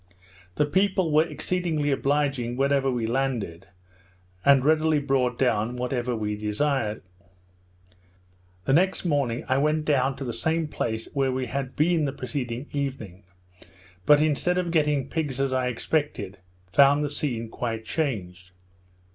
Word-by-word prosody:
The 150 - +2
people 190 +1 +1
were 155 +2 +4
exceedingly 165 -7 -1
obliging 135 -3 0
wherever 135 0 +2
we 120 -3 -1
landed, 115 -8 -2 0.8
and 140 +1 +5
readily 155 0 +3
brought 135 -4 0
down 120 -2 +1
whatever 125 0 -2
we 105 -1 -2
desired. 105 +2 -1 1.6
Next 185 +8 +2
morning 140 -7 0
I 130 +1 +2
went 150 +1 +1
down 135 -2 +2
to 135 - -6
the 120 - -3
same 160 +3 0
place 110 -6 -3
where 135 -2 +1
we 130 0 -2
had 130 +1 -4
been 160 0 +2
the 135 - -2
preceding 125 0 -4
evening; 130 -10 -5 0.8
but 145 0 +7
instead 155 +4 +1
of 175 -2 -1
getting 150 -4 +1
pigs, 145 -4 -3
as 135 -1 0
I 130 -1 +1
expected, 125 -5 -2 0.3
found 140 +1 +5
the - - 0
scene 125 -7 -2
quite 115 -1 -4
changed. 95 - -3
135 Hz, 140 wpm, -25 LUFS, 120-150 Hz, 1.6 s, but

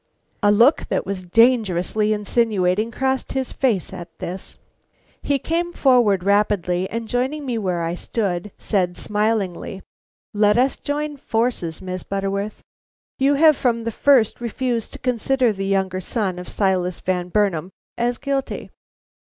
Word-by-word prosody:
A 205 -1 +4
look 235 +9 +4
that - - -1
was 190 -1 -4
dangerously 215 -1 +3
insinuating 210 -1 +1
crossed 265 +2 -1
his 265 -1 -2
face 215 - 0
at 175 -2 -8
this. 185 +2 -7 0.6
He 285 - +1
came 335 +5 -2
forward 235 -9 +3
rapidly 190 -3 +1
and, 230 0 -4
joining 265 +6 -1
me 240 -3 -1
where 180 -4 -1
I 165 +1 -1
stood, 190 0 -2
said 180 -4 0
smilingly: 210 -3 -1 0.5
"Let 210 +1 +3
us 260 +2 +2
join 295 0 -3
forces, 225 - -2
Miss 185 0 -4
Butterworth. 200 +1 -3 0.6
You 275 +2 +3
have 310 +1 +6
from 235 -3 0
the 230 - -2
first 245 -2 +3
refused 240 -1 -2
to - - -5
consider 250 -1 +1
the 195 -1 -4
younger 190 -1 0
son 190 -3 -2
of 180 - -8
Silas 185 -3 0
Van 180 -1 -2
Burnam 185 -4 +1 0.3
as 240 0 0
guilty. 275 -1 -3
210 Hz, 145 wpm, -21 LUFS, 185-250 Hz, 0.6 s, have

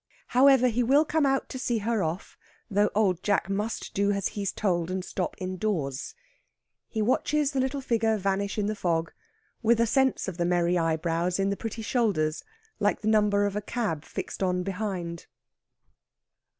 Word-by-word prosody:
However, 260 0 +6
he 240 +1 0
will 275 +6 +4
come 305 -1 +2
out 270 0 +1
to 260 - -6
see 240 -2 0
her 220 0 0
off, 165 +3 -3 0.4
though 205 +1 +3
Old 190 -5 +2
Jack 200 -2 0
must 210 +3 -3
do 200 +1 +2
as 200 -1 -1
he's 200 -2 -3
told, 175 -4 0
and 185 0 -3
stop 185 - -3
indoors. 185 -7 -3 0.7
He 220 -2 -1
watches 290 +5 +1
the 275 - -1
little 265 +2 -1
figure 225 -3 +1
vanish 200 +1 -1
in 210 - +1
the 215 - 0
fog, 165 -4 -1 0.5
with 230 0 +3
a 230 - +4
sense 265 +1 +1
of 185 -3 -5
the 175 - 0
merry 175 0 +2
eyebrows 165 +1 0
in 195 0 +1
the - - 0
pretty 225 +1 -5
shoulders, 195 -11 0 0.4
like 205 0 +1
the 215 - -3
number 210 -2 +3
of 205 -1 -2
a 210 - -1
cab 205 -9 -2
fixed - - -6
on 180 -1 +1
behind. 185 -4 -4
205 Hz, 175 wpm, -27 LUFS, 180-230 Hz, 0.7 s, However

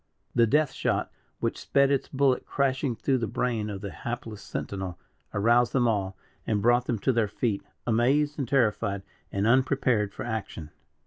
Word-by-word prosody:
The 115 -1 +4
death 150 +3 +3
shot, - - -1 0.3
which - - -1
sped 140 0 +3
its 140 - +1
bullet 135 -1 +2
crashing 135 -2 0
through 130 +4 +1
the 115 - -1
brain 115 -4 -1
of 100 -2 -5
the 100 - -5
hapless 115 -3 -6
sentinel, 95 -3 -5 0.3
aroused 120 +3 +3
them 125 -3 +3
all, 95 -4 -1 0.3
and 105 -2 +1
brought 120 +3 +3
them 120 - 0
to 130 +6 +1
their 115 -2 +2
feet, 105 0 -1 0.2
amazed 135 +6 +2
and 135 - -1
terrified, 105 -6 +1 0.3
and 100 +1 0
unprepared 125 -3 +2
for - - -7
action. 100 -9 -5
120 Hz, 170 wpm, -27 LUFS, 105-130 Hz, 0.3 s, The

